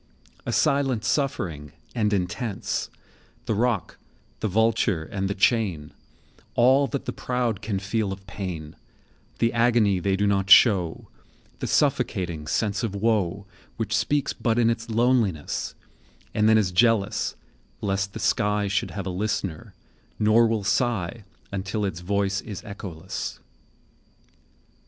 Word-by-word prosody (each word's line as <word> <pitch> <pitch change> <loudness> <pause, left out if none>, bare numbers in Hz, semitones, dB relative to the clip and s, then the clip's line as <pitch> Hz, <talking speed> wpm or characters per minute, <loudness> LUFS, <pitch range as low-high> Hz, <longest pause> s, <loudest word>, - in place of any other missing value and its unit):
A - - 0
silent 135 -5 +1
suffering, 90 - -1 0.2
and 105 -3 +1
intense; 100 +2 -2 0.6
The - - 0
rock, 115 -2 -1 0.4
the - - -1
vulture, 110 -4 +2
and 95 +4 -3
the 100 - -2
chain, 95 -8 +1 0.6
All 130 +4 +5
that 140 - -4
the - - -3
proud 120 -5 -1
can 105 -2 -2
feel 100 +1 -1
of 95 0 -8
pain, 90 -6 -6 0.6
The 115 - +1
agony 115 -5 +3
they 95 +2 +1
do 100 +1 +1
not 100 -1 +1
show, 95 -5 +5 0.5
The - - -3
suffocating 85 -5 0
sense 105 +2 0
of 110 -4 -2
woe,10 100 -3 0 0.3
Which 110 -1 -1
speaks 145 -1 +1
but 115 -2 0
in 115 -1 +4
its 115 0 -4
loneliness, 115 - +1 0.6
And 105 0 +3
then 110 - +6
is 100 -4 +2
jealous 110 +1 +2 0.4
lest 100 -1 -1
the - - -6
sky 105 0 +1
Should 100 -1 0
have 100 -2 -5
a 95 - -2
listener, 95 -4 -3 0.4
nor 110 +2 +5
will 110 -2 -1
sigh 110 -1 0 0.3
Until 100 +2 -2
its 95 -4 -3
voice 100 +1 0
is 100 -3 -8
echoless. 95 -4 -6
105 Hz, 135 wpm, -25 LUFS, 95-115 Hz, 0.6 s, then